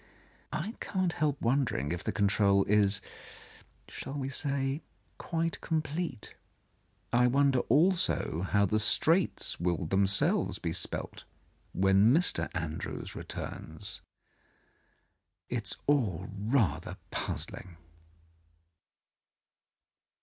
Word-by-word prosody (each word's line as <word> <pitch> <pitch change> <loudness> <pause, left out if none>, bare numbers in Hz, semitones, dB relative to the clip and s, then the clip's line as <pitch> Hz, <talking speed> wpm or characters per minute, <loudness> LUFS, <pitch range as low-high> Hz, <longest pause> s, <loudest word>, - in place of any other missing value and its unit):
I 195 +8 -3
cannot 185 -4 -1
help 145 -2 0
won 135 +4 +2
dering 75 - -2
if 90 +1 -4
the - - -1
control 100 -1 +3
is 100 -1 +3 0.4
— - - -22 0.2
shall 135 - -7
we 135 -2 -3
say? 140 +1 -1 0.2
— - - -39
qui'te 165 -1 -2
com 160 -1 -1
plete. 155 -7 -5 0.8
I 125 +1 +5
wonder 135 0 +3
also 165 - +2
how 100 0 +3
the 110 +3 +1
straits 165 - +2
will 85 0 0
get 80 - -6
them 95 0 +3
selves 100 +1 +2 0.2
spelt - - -4 0.5
when 95 +3 +4
Mr. 170 +6 +4
Andrews 80 -2 -5
returns. - - -7 1.5
It 120 -3 -3
is - - +5
all 105 - +1
rather 100 - 0
puzzling. 90 -3 -4
120 Hz, 110 wpm, -30 LUFS, 95-145 Hz, 1.5 s, I